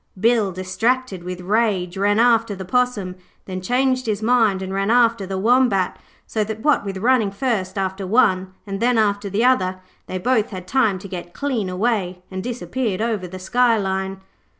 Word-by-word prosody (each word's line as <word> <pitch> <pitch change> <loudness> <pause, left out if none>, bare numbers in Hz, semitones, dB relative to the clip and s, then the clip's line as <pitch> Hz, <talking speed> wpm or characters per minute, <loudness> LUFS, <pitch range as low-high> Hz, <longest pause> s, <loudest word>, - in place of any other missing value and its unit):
Bill, 220 -2 +3
distracted 190 +3 -1
with 180 0 -6
rage, 195 -2 0
ran 205 +2 +2
after 230 -3 +3
the 190 0 -7
Possum, 215 -5 0 0.3
then 185 -1 -5
changed 255 +4 +1
his 215 0 -1
mind 220 -5 +3
and 190 0 -5
ran 195 +1 0
after 230 -4 +3
the 190 0 -3
Wombat, 225 -3 +2 0.3
so 215 - -1
that, 220 +1 -5
what 300 -4 +3
with 195 -1 -4
running 230 0 +2
first 205 -3 -2
after 190 0 -2
one 190 -4 +2
and 195 -1 -5
then 240 0 +2
after 205 -2 +1
the 210 +5 +1
other, 185 -8 +2 0.3
they 185 - -3
both 220 +2 +1
had 185 -3 -7
time 225 -5 +2
to 190 - -9
get 175 -2 -8
clean 250 -9 -2
away, 185 -2 -1
and 190 0 -4
disappeared 245 -3 -3
over 220 -5 -1
the 185 +1 -8
skyline. 195 -2 +1
205 Hz, 175 wpm, -21 LUFS, 190-235 Hz, 0.3 s, Bill